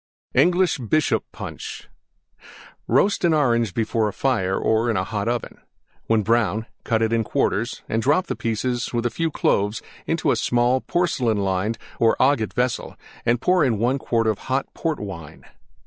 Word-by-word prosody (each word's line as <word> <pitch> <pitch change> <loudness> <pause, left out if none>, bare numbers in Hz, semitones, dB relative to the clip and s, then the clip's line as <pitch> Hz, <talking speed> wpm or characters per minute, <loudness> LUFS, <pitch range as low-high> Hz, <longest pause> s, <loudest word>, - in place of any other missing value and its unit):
ENGLISH 175 +3 +3
BISHOP 135 +6 +1
PUNCH - - -8 1.0
Roast 185 - +2
an 170 -2 +4
Orange 120 -7 +2
before 110 -1 +1
a - - -2
fire 100 -8 0
or 110 +2 +1
in 110 - +1
a 95 - +1
hot 100 +2 -3
oven. 120 0 -3 0.5
When 110 -1 +2
brown 110 -1 +1 0.2
cut 115 -1 +1
it 110 0 +1
in 115 -1 +2
quarters - - -1
and 115 - 0
drop 150 +9 +2
the - - -3
pieces, 120 +2 -2
with 120 0 -1
a 120 - +1
few 165 -1 -1
Cloves, 105 -7 0 0.2
into - - +1
a - - +2
small 120 +2 +2
porcelain 130 -11 0
lined 100 +3 -1 0.2
or 115 -1 +3
agate 130 -5 +2
vessel, 125 0 -1 0.3
and 120 0 +3
pour 180 +4 +3
in 120 -6 +2
1 125 +6 +1
quart 115 -3 0
of 110 -2 0
hot 135 +1 +1
Port 160 -3 -2
Wine. 90 -7 -8
115 Hz, 170 wpm, -23 LUFS, 110-135 Hz, 1.0 s, an